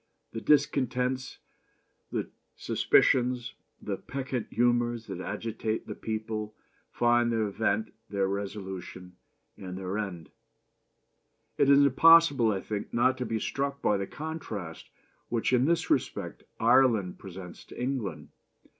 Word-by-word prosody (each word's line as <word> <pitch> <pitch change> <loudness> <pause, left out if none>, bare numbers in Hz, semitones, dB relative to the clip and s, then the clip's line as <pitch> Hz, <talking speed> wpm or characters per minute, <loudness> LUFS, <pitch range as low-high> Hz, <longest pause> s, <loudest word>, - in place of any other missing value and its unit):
The 115 - -5
discontents, 130 -2 +1 0.7
the - - -3 0.2
suspicions, 125 -1 +2 0.3
the - - -4
peccant 130 -3 -4
humours 120 -1 +1
that - - -6
agitate 110 -1 -3
the - - -5
people, 110 -1 -4 0.4
find 120 0 +3
there 115 -1 +1
their 105 - 0
vent, 110 +1 -1 0.2
their 100 -1 0
resolution, 95 -2 -6 0.4
and 95 -1 -7
their 95 +2 -3
end. 90 -6 -5 1.3
"It 140 - +4
is 140 - +7
impossible, 145 -4 +6
I 95 -2 -2
think, 105 0 -5
not 125 +2 +3
to 125 - -2
be 110 - -1
struck 140 +4 -2
by 105 - +3
the 100 0 -3
contrast 115 - -6 0.4
which, 120 +2 0
in 125 +1 +4
this 165 +1 +1
respect, - - -1
Ireland 110 -9 +3
presents 95 -2 -10
to - - -11
England. 125 -4 -3
115 Hz, 130 wpm, -29 LUFS, 100-130 Hz, 1.3 s, is